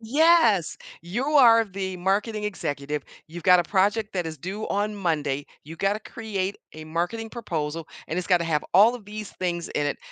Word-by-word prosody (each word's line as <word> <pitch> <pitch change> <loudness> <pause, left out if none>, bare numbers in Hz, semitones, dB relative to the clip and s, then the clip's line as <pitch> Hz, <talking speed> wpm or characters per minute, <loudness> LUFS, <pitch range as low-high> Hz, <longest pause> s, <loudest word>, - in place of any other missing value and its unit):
yes! 235 - +4 0.3
"You 195 +10 -3
are 240 -7 +6
the 190 -2 -5
marketing 210 +4 0
executive, 145 -7 -3 0.2
you've 170 +2 -9
got 180 +1 +6
a - - 0
project 205 +4 +1
that 180 -3 -1
is 160 -1 -6
due 195 +8 -5
on 205 +1 -1
Monday, 150 -7 -1 0.2
you 160 +3 -10
gotta 200 +4 0
create 205 -3 -4 0.2
a 155 0 -9
marketing 175 +8 -3
proposal, 165 -8 -4 0.2
and 170 - -2
it's 180 - -3
gotta 175 -3 +3
have 155 -3 0
all 215 +6 +7
of 240 -4 -9
these 210 0 -7
things 175 -2 -2
in 145 - -1
it, 145 - -2
190 Hz, 185 wpm, -25 LUFS, 165-215 Hz, 0.3 s, all